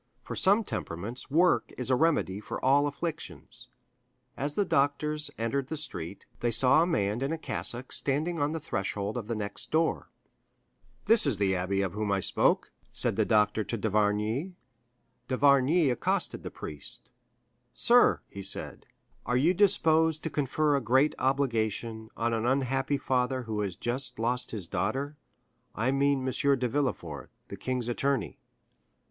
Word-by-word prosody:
For - - -6
some 205 +4 +4
temperaments 105 - -6
work 170 +5 +2
is 125 0 +1
a - - +5
remedy 145 - +1
for 105 - -6
all 140 +2 +4
afflictions. 155 +3 -5 0.7
As 145 +2 -3
the 205 - +1
doctors 150 0 +1
entered 130 +4 -2
the 160 - -4
street, 90 - -6
they 120 - 0
saw 130 +6 +5
a 170 - +2
man 105 - 0
in 135 +2 -1
a 165 - -2
cassock 125 -5 -5
standing 155 +5 -1
on 145 +1 0
the 160 - -3
threshold 100 -7 -3
of 115 -4 -4
the 115 - -2
next 100 -1 -5
door. 160 +1 0 1.0
"This 225 -8 +4
is 125 -8 +1
the 100 -1 +1
abbé 95 +2 0
of 95 - -5
whom 105 -1 -2
I 100 - +2
spoke," - - +1 0.2
said - - +7
the 110 0 +1
doctor 105 0 +2
to 115 +4 -4
d'Avrigny. 105 - 0 0.7
D'Avrigny 140 +3 +3
accosted 120 - -1
the - - -6
priest. 75 -2 -7 0.6
"Sir," - - +4
he 100 - -9
said, 95 - -1 0.4
"are 125 +1 +1
you 160 +8 +3
disposed 160 -5 +3
to 160 - -3
confer 145 +1 +1
a 140 - 0
great 130 +6 +3
obligation 115 -4 -1
on 115 0 0
an 110 -1 -1
unhappy 135 +1 0
father 130 -1 -1
who 110 -2 -4
has 100 -3 -2
just 120 +6 -4
lost 120 +2 -1
his 105 -6 -4
daughter? 110 - -2 0.6
I 115 +5 0
mean 135 -1 +1
M. 140 +1 +2
de 125 - 0
Villefort, 110 - -3 0.2
the - - -6
king's 125 +4 -3
attorney." 120 - -1
130 Hz, 160 wpm, -28 LUFS, 105-145 Hz, 1.0 s, said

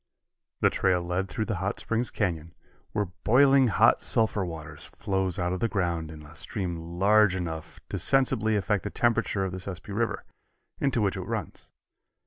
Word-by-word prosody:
The - - +4
trail 90 -2 +1
led 90 +2 -1
through 110 +3 -3
the 110 -4 -2
Hot 95 +1 -2
Springs 115 +2 -1
Canyon, 85 -5 -2 0.4
where 105 -4 -1
boiling 135 +4 +5
hot 105 - +4
sulphur 110 -3 +1
water 80 -3 -7
flows 95 0 -2
out 90 0 -1
of 95 - -3
the 115 - +1
ground 85 -6 -1
in 75 -1 -10
a 75 +3 -14
stream 85 -1 -4
large 105 0 +5
enough 80 -4 -5
to - - -3
sensibly 130 -5 +2
affect 100 0 0
the 100 - -3
temperature 115 -4 +1
of 95 - -3
the 95 - -5
Sespe 95 +2 -7
River, 115 +3 -2 0.5
into 135 -4 +1
which 100 -2 0
it - - -3
runs. - - -5
95 Hz, 175 wpm, -27 LUFS, 85-110 Hz, 0.5 s, boiling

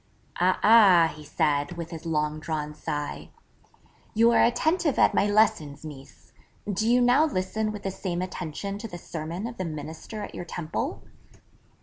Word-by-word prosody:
'A 185 +1 +3
ah,' 195 -7 +7
he 150 - -11
said 150 +1 0
with 170 -1 -6
his 165 0 -7
long 150 -1 -1
drawn 155 -1 -4
sigh, 150 -1 -5 0.9
'you 230 +2 +5
are - - +5
attentive 315 +5 +1
at - - +4
my 205 - +2
lessons, 205 -9 +1
Mees; 140 -3 -12 0.3
do 210 +2 0
you 245 +1 +5
now 250 +5 +5
listen 215 -4 -2
with 210 -1 -8
the 195 - -2
same 180 -2 -4
attention 185 +3 -5
to 225 - -6
the 175 - -8
sermon 165 +4 -6
of 235 0 -6
the 185 - -2
Minister 160 +7 -7
at - - -8
your - - -5
Temple?' 165 -2 -4
180 Hz, 165 wpm, -26 LUFS, 155-215 Hz, 0.9 s, ah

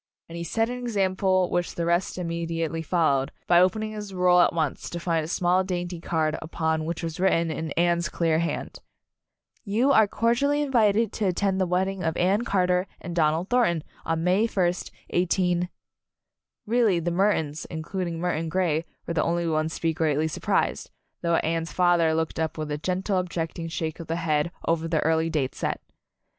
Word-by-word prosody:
And 165 - -9
he 170 - -4
set 225 +7 0
an 250 - -4
example 190 -5 +1
which 175 0 -1
the 170 - -1
rest 170 +2 0
im 175 -2 -3
mediately 165 -1 -2
followed, 155 -6 +1
by 175 -1 +5
opening 215 +4 +1
his 210 -3 -7
roll 180 -1 +5
at - - +4
once, 160 -4 -2
to 170 - -5
find 165 -2 0
a - - -5
small, 180 +2 +2
dainty 175 -2 -3
card 155 -2 0
upon 160 -1 -1
which 170 +1 -4
was 165 +2 -4
written 170 -3 +2
in 160 0 -4
Anne's 170 0 +1
clear 165 -2 +1
hand: 170 0 -3 0.8
"You 230 +6 +2
are 220 -5 +6
cordially 265 +8 +1
invited 225 -5 +2
to 215 - -1
attend 190 +1 0
the 185 - +2
wedding 190 +1 0
of 160 0 -1
Anne 195 +6 +2
Carter 180 -2 +1
and 170 -1 -6
Donald 160 +2 +1
Thornton 225 -11 +2 0.2
on 165 0 -1
May 190 +6 +3
first, 180 -5 0 0.2
18 180 0 +1 1.0
Really 220 -5 +3
the 170 +1 -2
Murtons, 170 -5 0
including 170 +1 -4
Murton 165 -2 -1
Grey, 165 -2 0 0.2
were 170 - -3
the 160 - +1
only 170 0 0
ones 160 0 0
to - - -10
be 165 -1 +2
greatly 155 -2 +1
surprised, 155 - -1 0.3
though 170 -1 +2
Anne's 165 0 -1
father 175 -3 +3
looked 160 0 -2
up 160 0 -2
with 155 -1 -4
a 145 - -1
gentle 185 +3 0
objecting 165 -2 -3
shake 160 0 -4
of 165 - -7
the 165 - -1
head 160 -1 0 0.2
over 165 0 +1
the 160 -2 +1
early 160 0 +2
date 150 -5 -1
set. - - -2
170 Hz, 185 wpm, -26 LUFS, 160-185 Hz, 1.0 s, are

